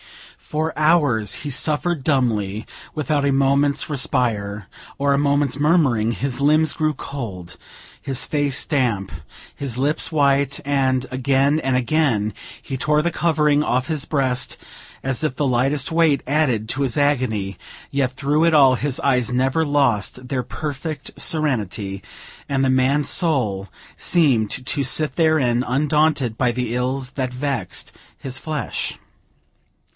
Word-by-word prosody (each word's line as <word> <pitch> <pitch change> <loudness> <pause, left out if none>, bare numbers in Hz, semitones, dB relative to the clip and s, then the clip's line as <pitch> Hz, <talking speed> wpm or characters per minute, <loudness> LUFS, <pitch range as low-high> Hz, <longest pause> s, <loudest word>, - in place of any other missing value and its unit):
For 155 +1 -3
hours 145 - +2
he - - -2
suffered 150 +3 0
dumbly, 110 -8 0 0.3
without 150 -1 0
a 140 - +2
moment's 140 +1 +2
respite, 115 -8 0 0.3
or 140 0 +2
a - - +2
moment's 140 -1 +1
murmuring; 145 -8 +2
his 130 +2 -3
limbs 155 +2 +3
grew 155 -1 0
cold, 105 -13 -7 0.5
his 135 -3 0
face 145 -2 +1
damp, 120 - 0 0.4
his 130 -4 -4
lips 145 +4 0
white, 140 -2 +2
and, 130 -2 +1
again 135 +3 +2
and 130 -2 +1
again, 120 -5 +1 0.3
he 135 - -5
tore 150 +3 +2
the 170 +2 0
covering 150 -3 +2
off 130 -1 0
his 155 -3 -1
breast, 130 -4 -1 0.5
as 135 +2 -1
if 150 -4 -1
the 145 - 0
lightest 135 +4 +1
weight 160 -4 +3
added 130 -7 +1
to 135 - -1
his 130 -4 0
agony; 125 -10 0 0.3
yet 135 -2 0
through 145 +4 0
it 165 -1 +3
all, 135 -3 +6
his 140 +1 -2
eyes 125 -4 +1
never 130 +5 +1
lost 125 -4 0
their 125 -1 -2
perfect 145 +2 -5
serenity, 105 - -2 0.5
and 135 -1 +1
the - - +2
man's 135 +3 +2
soul 115 - +1 0.3
seemed 135 - +2 0.2
to 140 +1 -1
sit 150 +4 0
therein, 145 -8 +2
undaunted 145 -3 +1
by 125 -2 +2
the 120 -1 -3
ills 130 +1 -2
that 130 -2 -3
vexed 125 -8 -3 0.2
his 130 -1 -3
flesh. 150 -5 -3
135 Hz, 140 wpm, -21 LUFS, 125-150 Hz, 0.5 s, all